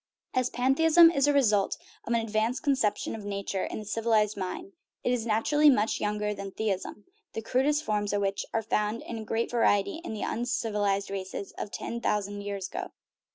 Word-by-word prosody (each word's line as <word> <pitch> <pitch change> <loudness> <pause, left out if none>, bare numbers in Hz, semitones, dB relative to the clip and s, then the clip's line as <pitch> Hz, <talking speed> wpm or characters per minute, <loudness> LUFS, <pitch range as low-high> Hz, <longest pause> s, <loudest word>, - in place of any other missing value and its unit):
As 255 -1 +1
pantheism 325 +7 +5
is 280 -3 +2
a - - +5
result 215 -8 +2 0.3
of 235 - -1
an 235 - +3
advanced 225 +2 -1
conception 225 -8 +1
of 220 - -6
nature 200 -1 -3
in - - -5
the 215 - -6
civilized 215 -1 +1
mind, 205 - -5 0.3
it 245 - +1
is 235 -2 -2
naturally 295 +8 +4
much 220 -5 +2
younger 210 0 -1
than 200 -1 -6
theism, 205 0 -3 0.3
the 225 - -3
crudest 290 +6 +1
forms 210 -3 -1
of 205 0 0
which 195 0 -1
are 225 - 0
found 210 +1 -1
in 225 -2 -6
great 225 +2 -1
variety 235 +5 +2
in 220 - -5
the 210 - -4
uncivilized 210 -5 -1
races 195 0 -5
of - - -5
ten 235 +3 -5
thousand 205 -2 -1
years 200 -2 -4
ago. 375 +1 -5
220 Hz, 185 wpm, -28 LUFS, 205-250 Hz, 0.3 s, pantheism